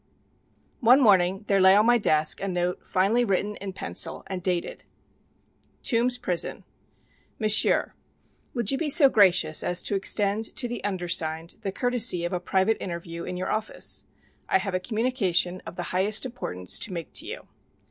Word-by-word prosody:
One 250 +3 +5
morning 195 -5 +3
there 195 -1 +2
lay 190 +1 +7
on 210 +2 +4
my 240 0 +4
desk 155 -6 +2
a 195 - -2
note 180 -1 -2
finely 200 +6 +2
written 205 -1 -1
in 195 0 -6
pencil 185 - -5
and 190 -1 -5
dated: 175 -1 -1 1.0
TOMBS 245 0 +1
PRISON. 180 -7 -3 0.7
MONSIEUR: 215 -2 +2 0.6
Will 240 - -1
you 270 +6 +2
be 320 - -2
so 285 -1 +7
gracious 180 -8 +3
as 180 - +1
to - - -3
extend 200 +2 +1
to 245 - 0
the 240 0 -6
undersigned 170 -4 -3
the 195 - -3
courtesy 230 -6 +1
of 175 - -4
a 180 - -1
private 190 +4 0
interview 170 -1 -6
in 180 - -5
your 185 +1 -3
office? 215 0 -3 0.4
I - - +4
have 190 0 -4
a 185 - 0
communication 190 -5 -1
of - - -8
the 175 - -4
highest 200 +6 +2
importance 90 - -3
to 195 - -4
make 170 -2 -7
to - - 0
you. - - -7
195 Hz, 170 wpm, -25 LUFS, 180-225 Hz, 1.0 s, lay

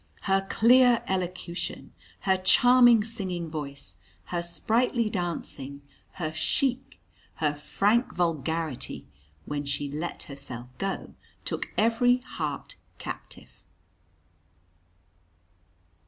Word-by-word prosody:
Her 195 0 +1
clear 245 +1 +6
elocution, 180 -1 -3 0.3
her 190 -1 +3
charming 240 +4 +6
singing 185 -6 -3
voice, 140 - -6 0.3
her 175 - -2
sprightly 225 +6 +1
dancing, 150 - -4 0.3
her 155 -4 -3
chic, 255 +9 -1 0.4
her 150 -2 +1
frank 205 - +1
vulgarity, 160 -4 -1 0.4
when 145 0 -3
she 140 0 -3
"let 155 +4 -4
herself 125 -4 -8
go," 195 0 -3 0.3
took - - -3
every 235 +3 +4
heart 155 - -5 0.2
captive. - - -9
180 Hz, 90 wpm, -28 LUFS, 150-225 Hz, 0.4 s, clear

